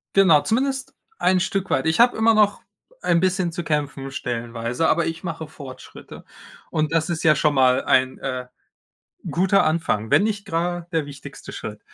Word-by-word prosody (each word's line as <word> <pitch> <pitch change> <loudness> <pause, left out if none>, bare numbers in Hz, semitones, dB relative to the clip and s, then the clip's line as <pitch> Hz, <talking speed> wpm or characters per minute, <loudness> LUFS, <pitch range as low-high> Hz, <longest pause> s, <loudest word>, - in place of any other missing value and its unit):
Genau, 185 -6 +6
zumindest 265 - -1 0.3
ein 185 -1 +3
Stück 190 0 -2
weit. - - 0
Ich 160 +1 +1
habe 245 +1 +5
immer 225 +1 +4
noch 210 -1 +2 0.4
ein 170 - +2
bisschen 185 -1 0
zu 170 0 -5
kämpfen, 145 -3 -2
stellenweise, 120 +2 -3
aber 170 0 +2
ich 165 +2 -5
mache 165 -2 -4
Fortschritte 140 -4 -11 0.5
und 155 0 -1
das 165 0 +1
ist 170 -2 -2
ja 155 -1 +6
schon 150 0 +2
mal 130 -2 +3
ein, 130 0 +2
äh, 130 -1 -4 0.8
guter 190 +3 +3
Anfang, 135 -9 -1
wenn - - +5
nicht 210 -2 -2
grade 175 -2 -2
der 160 -3 0
wichtigste 140 -1 -10
Schritt, 105 0 -7
165 Hz, 170 wpm, -22 LUFS, 140-185 Hz, 0.8 s, Genau